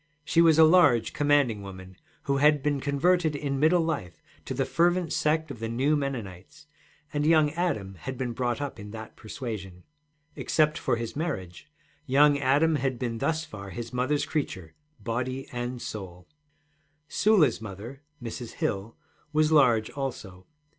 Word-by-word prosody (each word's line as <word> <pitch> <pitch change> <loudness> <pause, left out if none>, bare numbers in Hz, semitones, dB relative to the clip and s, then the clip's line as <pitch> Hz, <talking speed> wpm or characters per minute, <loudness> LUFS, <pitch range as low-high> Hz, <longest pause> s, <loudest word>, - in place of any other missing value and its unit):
She 165 - +3
was 165 -2 +5
a 160 - +8
large, 155 -9 +5
commanding 145 -7 +2
woman, 95 -1 -10 0.3
who 140 -1 0
had 145 0 +4
been 145 -1 +1
converted 155 +3 +1
in 140 -1 -2
middle 165 +3 +4
life 90 - -3 0.3
to - - -4
the - - 0
fervent 175 0 +1
sect 155 0 0
of 125 - -8
the 115 0 -3
new 135 +6 +1
Mennonites, 115 -11 -5 0.5
and 145 0 0
young 155 -1 +4
Adam 155 - -2
had 130 +8 -7
been 125 -2 -3
brought 120 +1 -1
up 145 -6 -5
in 105 0 -8
that 110 +1 -9
persuasion. 105 -7 -7 0.5
Except 155 -1 +1
for - - 0
his 115 -1 -5
marriage, 140 - -4 0.4
young 145 +2 +5
Adam 145 +4 +3
had 130 -2 -1
been 115 -2 -3
thus 160 +3 -1
far 100 -2 -9
his 120 +4 -7
mother's 130 +4 0
creature, 95 - -4 0.3
body 125 +5 -3
and 120 0 -4
soul. 90 -4 -8 0.8
Sula's 180 - +3
mother, 110 +6 -8 0.2
Mrs. 115 0 -6
Hill, 100 +3 -3 0.3
was 155 0 +2
large 120 -8 +4
also. 110 -10 -6
130 Hz, 155 wpm, -27 LUFS, 110-150 Hz, 0.8 s, a